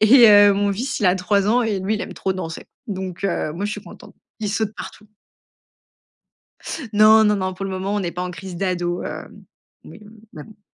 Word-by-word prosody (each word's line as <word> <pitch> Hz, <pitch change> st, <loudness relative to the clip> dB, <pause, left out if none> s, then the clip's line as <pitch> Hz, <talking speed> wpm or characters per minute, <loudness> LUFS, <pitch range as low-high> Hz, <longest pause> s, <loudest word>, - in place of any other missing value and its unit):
et 230 Hz, +2 st, +7 dB
heu, 205 Hz, -1 st, +7 dB
mon 200 Hz, 0 st, 0 dB
fils, 250 Hz, +7 st, -3 dB
il 210 Hz, -, +2 dB
a 180 Hz, -, +4 dB
3 195 Hz, +2 st, +1 dB
ans 245 Hz, +3 st, +3 dB
et 215 Hz, -4 st, -1 dB
lui, 195 Hz, +4 st, -1 dB
il 210 Hz, -, -3 dB
aime -, -, -7 dB
trop 190 Hz, -, -2 dB
danser. 165 Hz, -3 st, -6 dB, 0.2 s
Donc, 190 Hz, -3 st, -5 dB
heu, 175 Hz, -5 st, -1 dB
moi, 180 Hz, +6 st, -4 dB
je 210 Hz, -, -2 dB
suis -, -, -7 dB
contente. -, -, -14 dB, 0.3 s
Il 210 Hz, -2 st, -2 dB
saute 215 Hz, 0 st, -1 dB
partout. 210 Hz, -, -9 dB, 1.9 s
Non, 215 Hz, +1 st, +6 dB
non, 210 Hz, -1 st, +3 dB
non. 185 Hz, -1 st, -3 dB
Pour 195 Hz, -, -6 dB
le 195 Hz, -, -4 dB
moment, 190 Hz, +2 st, -3 dB
on 205 Hz, -, 0 dB
n'est 175 Hz, -3 st, -3 dB
pas 180 Hz, -, -4 dB
en 180 Hz, -, -4 dB
crise 180 Hz, 0 st, -8 dB
d'ado, 175 Hz, -1 st, -2 dB
hem, -, -, -8 dB, 0.4 s
oui, -, -, -12 dB
hem, 215 Hz, +1 st, -16 dB
mais 150 Hz, -, -9 dB
bon. 210 Hz, -1 st, -18 dB
200 Hz, 225 wpm, -21 LUFS, 185-210 Hz, 1.9 s, et